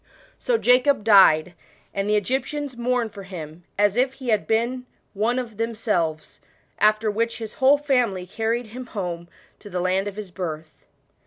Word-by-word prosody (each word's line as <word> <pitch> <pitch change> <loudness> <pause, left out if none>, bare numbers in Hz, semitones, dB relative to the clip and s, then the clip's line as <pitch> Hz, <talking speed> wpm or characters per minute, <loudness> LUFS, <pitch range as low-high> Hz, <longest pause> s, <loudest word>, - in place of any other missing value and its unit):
'* - - -27
So - - +1
Jacob 250 - +3
died, 180 -6 +6 0.4
and 200 +1 -2
the 210 - +3
Egyptian? 265 +7 -1
mourned 240 -2 -1
for 200 - -8
him, 170 -3 -9
as 205 +1 +2
if 260 +1 +2
he 260 -2 -7
had 215 -2 +1
been 240 +3 0 0.3
one 225 +4 0
of 235 -5 -5
themselves; 210 -9 -2 0.6
which 225 +2 0
his 220 -2 -7
whole 270 +2 +6
family 250 -10 0
carried 225 +5 -2
him 255 0 -7
home 175 -6 -5 0.3
to 205 - -12
land 185 +2 0
of 200 - -5
his 205 -3 -7
birth. 160 -3 -7
220 Hz, 160 wpm, -23 LUFS, 185-250 Hz, 0.6 s, died